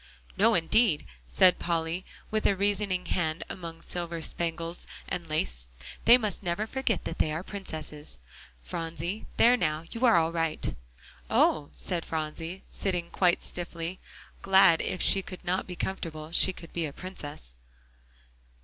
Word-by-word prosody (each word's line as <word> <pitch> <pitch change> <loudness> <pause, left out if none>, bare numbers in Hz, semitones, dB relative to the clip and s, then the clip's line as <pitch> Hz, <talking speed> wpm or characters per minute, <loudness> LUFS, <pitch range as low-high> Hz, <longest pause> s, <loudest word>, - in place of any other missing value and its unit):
"No, 220 +3 +4
indeed," 170 0 +3 0.2
said 180 - +5
Polly, 170 +1 -1 0.3
with 215 0 +2
a 200 - +3
rescuing 200 -2 0
hand 160 -2 -1
among 170 -3 -6
the - - -14
silver 170 -1 -4
spangles 165 +1 -2 0.2
and 170 -2 -4
lace; - - -2 0.4
"they 240 - +9
must 215 -4 -3
never 180 +3 -1
forget 260 0 -1
that 165 - -4
they 155 - +2
are 160 +3 -3
princesses, 155 - -6 0.5
Phronsie. 165 - -4
There 245 +2 +7
now, 155 -8 0
you're 230 -5 +4
all 165 0 +3
right." 165 -2 -1 0.6
"Oh!" 150 -2 +3
said 175 -3 -2
Phronsie, 165 +3 -4
sitting 180 -3 -2
quite 180 -2 +3
stiffly, 175 0 -5 0.4
glad 190 -4 +6
if 185 - -1
she 195 - +5
could 185 -1 -9
not 185 +2 0
be 180 - -6
comfortable, 165 -5 -4
she 180 - +5
could 165 -2 -12
be 170 -2 -1
a 140 - -8
princess. 145 - -8
170 Hz, 150 wpm, -29 LUFS, 160-190 Hz, 0.6 s, they